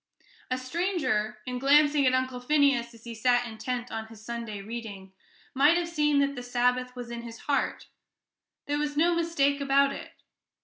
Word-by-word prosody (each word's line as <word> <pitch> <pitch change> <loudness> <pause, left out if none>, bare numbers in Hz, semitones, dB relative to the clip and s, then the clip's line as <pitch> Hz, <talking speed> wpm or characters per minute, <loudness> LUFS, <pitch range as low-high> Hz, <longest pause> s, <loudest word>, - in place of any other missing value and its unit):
A 255 - 0
stranger, 255 - -1
in 250 0 -4
glancing 290 +1 +4
at 255 - +3
Uncle 255 -1 -1
Phineas 270 -3 +2
as 230 - -17
he 235 - -7
sat 245 +2 +2
intent 240 +2 -4
on 220 0 -4
his 220 -1 -14
Sunday 230 -3 -5
reading, 200 -3 -8 0.4
might 290 +5 +5
have 345 -1 -1
seen 300 -3 +2
that 280 0 +1
the 250 - -5
Sabbath 250 +1 0
was 245 -1 -7
in 235 0 -5
his 230 -1 -10
heart 285 -1 -1 0.8
there 290 0 -1
was 295 0 -2
no 340 +3 +4
mistake 290 -4 +1
about 275 0 +3
it. - - -9
255 Hz, 175 wpm, -28 LUFS, 235-290 Hz, 0.8 s, might